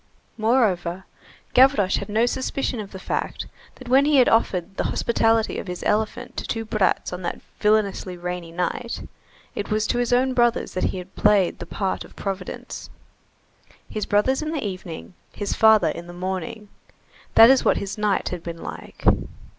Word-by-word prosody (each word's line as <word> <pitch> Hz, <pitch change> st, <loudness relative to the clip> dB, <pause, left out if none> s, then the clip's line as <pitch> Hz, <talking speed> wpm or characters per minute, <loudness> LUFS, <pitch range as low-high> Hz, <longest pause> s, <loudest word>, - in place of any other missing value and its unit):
Moreover, 195 Hz, -6 st, +1 dB, 0.5 s
Gavroche 250 Hz, -7 st, +5 dB
had -, -, -5 dB
no 220 Hz, +3 st, +3 dB
suspicion 260 Hz, 0 st, -2 dB
of 205 Hz, -2 st, -7 dB
the 190 Hz, -, -7 dB
fact 190 Hz, -, -3 dB, 0.3 s
that 255 Hz, -, -12 dB
when 265 Hz, +3 st, +5 dB
he 300 Hz, 0 st, +3 dB
had 255 Hz, -3 st, +6 dB
offered 195 Hz, -4 st, +1 dB
the -, -, -1 dB
hospitality 225 Hz, -1 st, +1 dB
of -, -, -7 dB
his 180 Hz, 0 st, -5 dB
elephant 220 Hz, +3 st, -1 dB
to -, -, -2 dB
two 225 Hz, -1 st, -3 dB
brats 210 Hz, -4 st, 0 dB
on 180 Hz, -, -5 dB
that 175 Hz, -, -4 dB, 0.2 s
villainously 210 Hz, -3 st, +1 dB
rainy 175 Hz, -1 st, -5 dB
night, 180 Hz, +7 st, -3 dB, 0.5 s
it 205 Hz, -, -4 dB
was 215 Hz, 0 st, +1 dB
to 240 Hz, -, 0 dB
his 245 Hz, -1 st, 0 dB
own 255 Hz, +1 st, +3 dB
brothers 240 Hz, -1 st, +1 dB
that 185 Hz, -, 0 dB
he -, -, -1 dB
had 180 Hz, +1 st, -9 dB
played 205 Hz, -4 st, +3 dB
the 175 Hz, -, -7 dB
part 190 Hz, +1 st, -2 dB
of -, -, -16 dB
Providence. 195 Hz, -2 st, -6 dB, 1.0 s
His 215 Hz, -, -4 dB
brothers 215 Hz, +7 st, +2 dB
in 310 Hz, -, -3 dB
the 305 Hz, -8 st, -3 dB
evening, 185 Hz, -3 st, -6 dB, 0.2 s
his 205 Hz, -1 st, -3 dB
father 220 Hz, -5 st, +5 dB
in 170 Hz, 0 st, -6 dB
the 175 Hz, -, -9 dB
morning; 190 Hz, +3 st, -5 dB, 0.7 s
that 225 Hz, +3 st, +10 dB
is 265 Hz, -, +4 dB
what -, -, +3 dB
his 200 Hz, 0 st, -4 dB
night 210 Hz, -2 st, 0 dB
had 180 Hz, -2 st, -5 dB
been 170 Hz, -1 st, -7 dB
like. -, -, -9 dB
210 Hz, 180 wpm, -23 LUFS, 185-235 Hz, 1.0 s, that